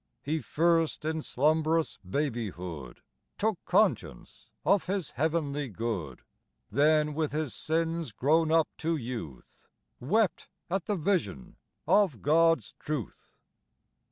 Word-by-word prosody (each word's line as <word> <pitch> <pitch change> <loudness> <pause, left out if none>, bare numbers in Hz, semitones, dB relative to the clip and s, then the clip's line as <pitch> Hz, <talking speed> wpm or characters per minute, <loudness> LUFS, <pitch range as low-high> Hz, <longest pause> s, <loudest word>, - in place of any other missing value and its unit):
He 155 +3 -1
first 165 0 +1
in 160 0 -1
slumbrous 155 +4 +1
babyhood 90 - -4 0.3
Took 215 -4 0
conscience 210 +4 0 0.2
of 200 -2 +3
his 190 -5 -2
heavenly 150 -2 -1
good; 100 - -4 0.5
Then 150 +4 +3
with 155 -1 -1
his 155 -3 -1
sins 165 -2 -1
grown 155 +8 +2
up 165 -1 +4
to 165 +1 0
youth 115 - -7 0.3
Wept 200 - +1 0.2
at 190 -1 -1
the 210 - 0
vision 155 - -1 0.3
of 190 - +3
God's 165 +3 +3
truth. 145 - -5
155 Hz, 110 wpm, -29 LUFS, 125-165 Hz, 0.5 s, up